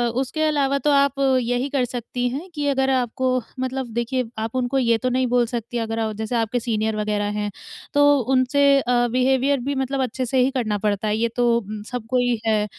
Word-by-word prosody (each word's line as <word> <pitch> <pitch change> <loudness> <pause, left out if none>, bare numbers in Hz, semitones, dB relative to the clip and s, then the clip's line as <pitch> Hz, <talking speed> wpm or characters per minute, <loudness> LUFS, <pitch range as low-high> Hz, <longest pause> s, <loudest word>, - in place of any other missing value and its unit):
उसके 270 +4 -2
अलावा 285 -3 +1
तो 295 - +1
आप 280 -1 +3 0.2
यही 245 +3 -1
कर 270 -3 +1
सकती 245 0 -3
हैं 295 +9 -6
कि 295 -1 -1
अगर 270 -1 +1
आपको 255 0 0 0.2
मतलब 260 0 -2
देखिए 240 +2 -1
आप 225 +2 -4
उनको 255 +2 0
ये 235 -3 +3
तो 255 +3 -1
नहीं 255 0 +1
बोल 245 0 +2
सकती 240 0 -4
अगर 225 0 -3
आ 220 -1 -1
जैसे 220 +3 -4
आपके 230 +1 0
सीनियर 220 -2 -1
वगैरह 210 -1 -1
हैं, 210 0 -2 0.5
तो 290 0 +5
उनसे 265 +2 +3 0.2
अ, 240 -1 +2
बिहेवियर 265 +2 +2
भी 280 +3 -2
मतलब 265 0 -1
अच्छे 255 +1 -3
से 260 +2 +1
ही 260 - +1
करना 230 -6 -1
पड़ता 205 0 -1
है, 210 0 0
ये 230 +1 +1
तो 235 -2 +2 0.3
सबको 250 0 -2
ही 245 -2 +1
है। 215 -1 +2
250 Hz, 205 wpm, -22 LUFS, 225-265 Hz, 0.5 s, तो